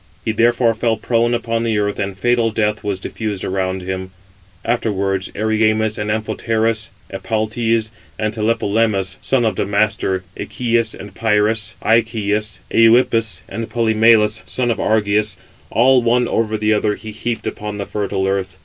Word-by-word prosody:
He - - +1
therefore 115 +1 +3
fell 115 0 0
prone 120 +1 +1
upon 115 -1 -1
the 115 -2 0
earth, 100 0 -1
and 100 -1 -3
fatal 120 +2 +2
death 105 -1 -1
was 100 -2 -2
diffused 105 -1 -4
around 95 -1 -2
him. 95 0 -4 0.6
Afterwards 100 -5 -1
Erymas, 110 0 +1
and 105 0 -2
Amphoterus, 110 +1 -1 0.2
Epaltes, 110 +3 -1 0.3
and 110 0 -1
Tlepolemus, 110 -3 0
son 130 -3 +1
of 110 - +1
Damastor, 100 -2 0
Echius 115 -3 -1
and 100 0 -9
Pyris, 110 0 +1
Icheus, 105 -3 +1
Euïppus, 115 -4 +4
and 115 0 -5
Polymelus, 110 -1 +3
son 125 -2 0
of - - -2
Argeus, 105 -2 +1 0.3
all 130 +2 +4
one 120 +1 +2
over 110 -1 0
the 110 0 +2
other 105 0 +1
he 110 +2 -9
heaped 115 +1 -4
upon 105 0 -4
the 100 - -3
fertile 100 -2 -2
earth. 95 -1 -2
110 Hz, 145 wpm, -19 LUFS, 105-115 Hz, 0.6 s, Euïppus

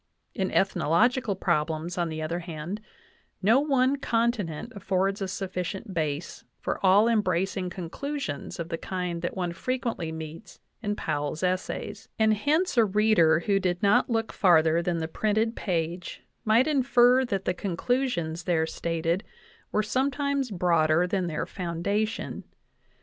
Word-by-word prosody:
In 190 -1 -1
ethnological 210 - +2
problems, 165 -1 -1
on 175 -2 -1
the 155 0 -4
other 165 +3 -2
hand, 170 +4 -6 0.6
no 225 +7 +5
one 275 -2 +2
continent 230 - -1
affords 195 0 0
a 195 - -1
sufficient 190 +2 -4
base 155 -1 -3 0.2
for - - -3
all 195 +4 +6
embracing 190 -4 +1
conclusions 180 - -5
of 170 0 -4
the 165 -1 -3
kind 180 -2 -3
that 175 - -3
one 175 -2 -1
frequently 230 -5 -2
meets 160 +4 -8 0.2
in 205 -2 -1
Powell's 155 -1 -3
essays; 185 0 -2
and 220 -1 +4
hence 295 - +1
a 230 - +6
reader 195 -6 +4
who 200 +2 +2
did 180 -1 -1
not 200 +4 +4
look 225 -1 -1
far 175 -5 +5
ther 165 +1 +2
than 170 0 -1
the 160 -1 -2
printed 220 +6 0
page 170 -2 -3 0.2
might 225 +4 +4
infer 260 -3 +4
that 195 -6 -2
the - - +1
conclusions 180 -3 -1
there 165 -3 +2
stated 165 +2 -1 0.5
were 215 - +1
sometimes 275 +3 0
broader 170 -3 +2
than 185 -1 -1
their 155 -2 -2
foundation. 200 +5 -2
190 Hz, 145 wpm, -27 LUFS, 170-225 Hz, 0.6 s, all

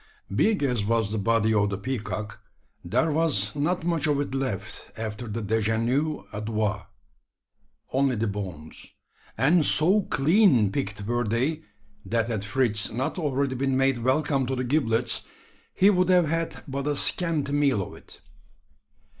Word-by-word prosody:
Big 215 -8 +2
as 125 -6 0
was 110 -1 0
the 110 - -1
body 110 +1 +2
of 105 -1 +2
the 100 - -3
peacock, 105 -2 -5 0.4
there 120 - +1
was 145 -10 +1
not 160 +5 -1
much 165 -3 0
of 145 -2 +1
it 145 -2 -3
left 130 -8 -4
after 110 +2 -5
that 110 0 -4
dejeuner 115 +8 0
aux 105 - -4
doigts! 105 -2 -2 1.1
Only 135 -1 +2
the 110 +1 -1
bones; 95 -7 -7 0.4
and 155 +8 +4
so 180 +9 +4
clean 150 - +3
picked 105 +2 -3
were 120 +2 0
they, 130 +8 -1 0.4
that 115 +3 -1
had 110 -4 -2
Fritz 105 -1 0
not 130 +9 -3
already 140 -3 -1
been 135 +1 0
made 135 -2 +2
welcome 135 0 +1
to 130 - -1
the 125 - -2
giblets, 120 -4 +1 0.4
he 195 +2 +4
would 180 -2 +1
have 180 -3 +4
had 165 +1 -3
but 140 +1 -4
a 145 - 0
scanty 155 -2 +1
meal 140 -8 +2
of - - -10
it. - - -16
125 Hz, 155 wpm, -25 LUFS, 110-145 Hz, 1.1 s, and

